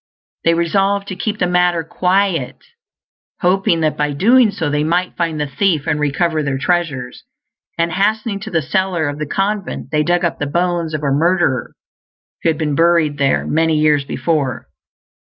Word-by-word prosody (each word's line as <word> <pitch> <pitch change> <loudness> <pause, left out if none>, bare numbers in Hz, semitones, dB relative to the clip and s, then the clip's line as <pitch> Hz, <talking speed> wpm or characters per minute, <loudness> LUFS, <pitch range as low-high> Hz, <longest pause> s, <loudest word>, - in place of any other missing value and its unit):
They 165 0 +4
resolved 195 +4 +1
to 190 - -4
keep 210 +2 -3
the 180 - +1
matter 180 -1 +2
quiet, 180 -4 0 0.8
hoping 180 -2 +2
that 155 -1 +1
by 150 -1 0
doing 230 - +4
so 180 -6 -3
they 150 +1 0
might 175 +3 0
find 165 -3 -2
the 150 - 0
thief 155 +1 0
and 150 - 0
recover 155 +2 0
their 140 -2 -2
treasures; 145 -6 -2 0.5
and 170 0 0
hastening 210 +2 0
to 215 +2 -7
the 165 -5 0
cellar 185 -1 0
of 145 +1 -4
the 150 - -3
convent 200 +4 -2
they 150 -1 +2
dug 175 +3 +1
up 170 - -2
the 145 - -2
bones 170 0 -1
of 150 - -5
a 140 - +1
murderer, 160 -4 +1 0.7
who - - +2
had 160 - 0
been 150 -2 -1
buried 165 -2 +2
there 135 -1 +1
many 160 0 +1
years 150 -2 +3
before. 140 -3 -2
165 Hz, 175 wpm, -17 LUFS, 150-185 Hz, 0.8 s, They